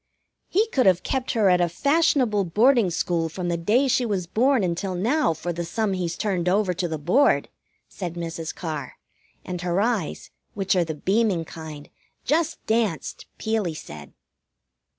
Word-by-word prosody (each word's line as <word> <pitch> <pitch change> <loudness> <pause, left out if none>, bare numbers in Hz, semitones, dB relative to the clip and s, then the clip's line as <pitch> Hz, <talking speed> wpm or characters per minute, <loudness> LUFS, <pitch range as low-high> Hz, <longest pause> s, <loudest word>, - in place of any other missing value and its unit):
"He 420 +5 +2
could 260 - +2
have 185 -1 +4
kept 260 -2 -2
her 220 -4 +3
at 180 -1 +4
a 175 - +2
fashionable 260 - +2
boarding 225 +4 +4
school 170 -1 -1
from 175 +2 -4
the 170 - 0
day 215 +11 +2
she 255 0 +2
was 200 -6 -1
born 240 +6 +2
until 180 +2 -2
now 235 - +1
for 175 +3 -4
the 170 +1 -3
sum 205 +4 -1
he's 175 -2 -2
turned 185 -4 0
over 195 -1 +2
to 175 0 -2
the 160 -1 -3
Board," 180 - +2 0.4
said 175 -3 -6
Mrs. 165 -1 -4
Carr, 155 -6 -5 0.5
and 180 -1 -5
her 180 +1 0
eyes, 215 -6 -1 0.2
which 195 -1 +1
are 180 - +3
the 160 -2 -4
beaming 190 0 +1
kind, 155 -2 -9 0.3
just 320 +3 0
danced, 220 -7 -1
Peelie 220 -7 -1
said. 75 - -10
185 Hz, 170 wpm, -24 LUFS, 170-230 Hz, 0.5 s, have